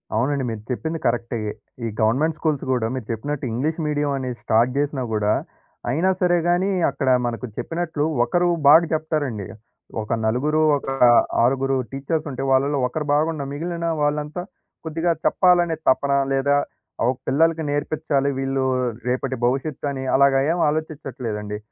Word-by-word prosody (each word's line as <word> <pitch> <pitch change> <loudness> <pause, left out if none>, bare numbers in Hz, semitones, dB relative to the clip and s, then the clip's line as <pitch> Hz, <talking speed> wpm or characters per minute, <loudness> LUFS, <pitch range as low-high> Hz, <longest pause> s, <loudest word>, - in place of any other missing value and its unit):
అవునండి. 135 +4 +1
మీరు 110 -2 -5
చెప్పింది 160 +5 -3
కరెక్టే. 120 0 -1 0.5
ఈ - - 0
గవర్నమెంట్ 150 +8 +2
స్కూల్స్ 155 -4 0
గూడా 120 -3 +1
మీరు 125 -5 -5
చెప్పినట్టు 135 +5 -3
ఇంగ్లీష్ 155 +8 -1
మీడియం 145 -1 0
అనేది 125 -2 -4
స్టార్ట్ 115 +3 +2
జేసినా 145 -2 0
గూడా, 105 0 +2 0.6
అయినా 165 +9 +2
సరే 175 -1 +3
గానీ 180 +3 +2 0.2
అక్కడ 135 -3 -1 0.2
మనకు 120 +2 -4
చెప్పినట్లు 165 -3 -2 0.2
ఒకరు 175 +6 +1 0.2
బాగా 160 +3 +8
చెప్తారండి. 150 - -2 0.5
ఒక 110 - -3
నలుగురు, 150 +8 +1 0.2
ఒక - - -9 0.6
ఆరుగురు 135 +2 +2 0.2
టీచర్స్ 155 +3 -2
ఉంటే 130 +1 -4
వాళ్ళలో 140 +2 +2
ఒకరు 150 +4 -4
బాగున్న 155 -1 +1
మిగిలిన 170 +2 -3
వాళ్ళంతా, 150 +3 -1 0.4
కొద్దిగా 165 +2 0
చెప్పాలనే 175 -3 +4
తపనా 140 +1 +2
లేదా 140 +1 +2 0.5
ఆహ్, 125 +2 +3
పిల్లలకి 160 +4 +2
నేర్పిచ్చాలి. 145 -1 0
వీళ్ళు 135 0 -1 0.4
రేపటి 130 +1 -1
భవిష్యత్తు 140 +3 -1
అని 130 -1 -4
అలాగా 135 0 +5
ఏం 175 - 0
ఆలోచిచ్చట్లేదండి. 130 -9 -4
140 Hz, 140 wpm, -22 LUFS, 130-155 Hz, 0.6 s, బాగా